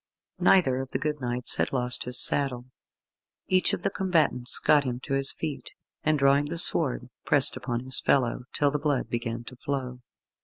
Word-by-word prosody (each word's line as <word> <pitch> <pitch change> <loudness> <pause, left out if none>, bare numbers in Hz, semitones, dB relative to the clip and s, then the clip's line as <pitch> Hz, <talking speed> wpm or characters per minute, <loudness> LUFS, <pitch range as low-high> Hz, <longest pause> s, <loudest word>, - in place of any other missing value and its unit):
Neither 130 -9 +3
of 135 - -8
the - - -2
good 150 -1 -3
knights 125 0 -1
had - - 0
lost 125 -2 -1
his 125 0 +2
saddle. 130 -4 +1 0.8
Each 185 0 +3
of - - -4
the - - 0
combatants 155 -10 +1
got 150 -1 +3
him 125 -2 -4
to 135 - -5
his 135 0 0
feet, 155 -3 -6 0.3
and 155 -1 +1
drawing 140 +1 +3
the 165 +3 -5
sword, 130 -7 +1
pressed 140 -3 +5
upon 125 -2 -4
his 130 +1 -2
fellow, 125 -2 0
till 145 -1 +1
the 150 - -2
blood 145 -3 -1
began 115 0 -4
to 125 - -11
flow. 130 -1 -5
135 Hz, 185 wpm, -26 LUFS, 125-145 Hz, 0.8 s, pressed